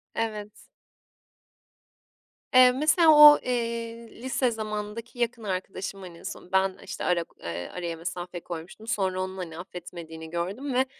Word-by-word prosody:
Evet. 210 Hz, -2 st, -3 dB, 2.0 s
Eee, 255 Hz, 0 st, +8 dB
mesela 310 Hz, +4 st, +5 dB
o, 300 Hz, -1 st, +10 dB
eee, 230 Hz, -1 st, -3 dB
lise 260 Hz, -1 st, +1 dB
zamanındaki 215 Hz, +2 st, -5 dB
yakın 235 Hz, -1 st, -1 dB
arkadaşım 190 Hz, 0 st, -4 dB
hani 175 Hz, -2 st, -10 dB
en -, -, -15 dB
son 180 Hz, -, -8 dB
ben 190 Hz, 0 st, +2 dB
işte -, -, -6 dB
ara 175 Hz, -1 st, +2 dB
k -, -, -28 dB
ııı, 85 Hz, +1 st, -5 dB
araya 170 Hz, -2 st, -4 dB
mesafe 175 Hz, +1 st, -5 dB
koymuştum. 175 Hz, +7 st, -8 dB
Sonra 190 Hz, -4 st, 0 dB
onun 190 Hz, 0 st, -4 dB
hani 165 Hz, -3 st, -6 dB
affetmediğini 170 Hz, -3 st, -9 dB
gördüm 195 Hz, -, -3 dB
ve, 260 Hz, +1 st, +3 dB
195 Hz, 140 wpm, -27 LUFS, 175-235 Hz, 2.0 s, o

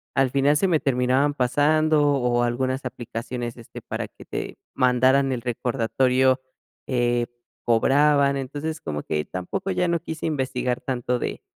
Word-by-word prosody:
al 135 Hz, -2 st, +2 dB
final 140 Hz, +2 st, +3 dB
se 190 Hz, -, +2 dB
me 165 Hz, -4 st, +2 dB
terminaban 130 Hz, +2 st, +2 dB
pasando, 150 Hz, +4 st, +3 dB
o 125 Hz, -3 st, +1 dB
algunas 130 Hz, +2 st, -1 dB
aplicaciones, 120 Hz, 0 st, -5 dB
este, 120 Hz, -2 st, -11 dB
para -, -, -4 dB
que -, -, -15 dB
te -, -, -5 dB, 0.2 s
mandaran 130 Hz, +2 st, +3 dB
el 125 Hz, -2 st, -2 dB
recordatorio, 125 Hz, +2 st, +1 dB, 0.5 s
eh, 120 Hz, -2 st, +1 dB, 0.4 s
cobraban. 140 Hz, +4 st, +3 dB
Entonces, 145 Hz, +4 st, -4 dB
como 75 Hz, -1 st, -4 dB
que 75 Hz, -1 st, -1 dB
tampoco 135 Hz, -, -4 dB
ya 180 Hz, -1 st, +1 dB
no 170 Hz, 0 st, +1 dB
quise 160 Hz, -1 st, -6 dB
investigar 130 Hz, -4 st, -1 dB
tanto 125 Hz, -1 st, -2 dB
de -, -, -4 dB
130 Hz, 145 wpm, -24 LUFS, 120-145 Hz, 0.5 s, final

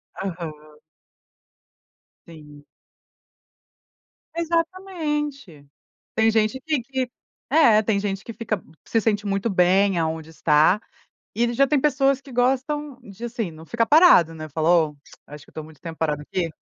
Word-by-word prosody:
Aham. 170 Hz, -4 st, -5 dB, 1.7 s
Sim. 150 Hz, -3 st, -14 dB, 1.7 s
Exatamente. 315 Hz, -, -3 dB, 0.5 s
Tem 220 Hz, 0 st, +3 dB
gente 220 Hz, +4 st, +1 dB
que 300 Hz, -4 st, -1 dB
que 260 Hz, 0 st, -3 dB, 0.4 s
é, 255 Hz, -8 st, +5 dB
tem 205 Hz, -2 st, 0 dB
gente 195 Hz, -1 st, -4 dB
que 230 Hz, -, -7 dB
fica, 215 Hz, -4 st, -3 dB, 0.2 s
se 225 Hz, -, +1 dB
sente 210 Hz, -1 st, 0 dB
muito 200 Hz, +3 st, -1 dB
bem 190 Hz, +1 st, +3 dB
aonde 160 Hz, -1 st, -2 dB
está, 155 Hz, +6 st, +3 dB, 0.5 s
e 235 Hz, +2 st, +1 dB
já 275 Hz, +3 st, +3 dB
tem 295 Hz, +1 st, +2 dB
pessoas 275 Hz, -1 st, +2 dB
que 270 Hz, -2 st, -14 dB
gostam 265 Hz, +3 st, 0 dB
de, 210 Hz, +1 st, -11 dB
assim, 230 Hz, -6 st, -3 dB
não 160 Hz, +1 st, -13 dB
ficar 235 Hz, -1 st, +1 dB
parado, 290 Hz, -, +6 dB
né, 155 Hz, 0 st, -8 dB
fala 160 Hz, +3 st, 0 dB
"Ó, 160 Hz, -4 st, +3 dB, 0.3 s
acho 150 Hz, 0 st, -11 dB
que -, -, -21 dB
eu -, -, -30 dB
estou 155 Hz, -, -7 dB
muito 155 Hz, -2 st, -15 dB
tempo 165 Hz, -2 st, -8 dB
parado 150 Hz, -2 st, -1 dB
aqui, 170 Hz, +2 st, -2 dB
215 Hz, 145 wpm, -23 LUFS, 165-270 Hz, 1.7 s, parado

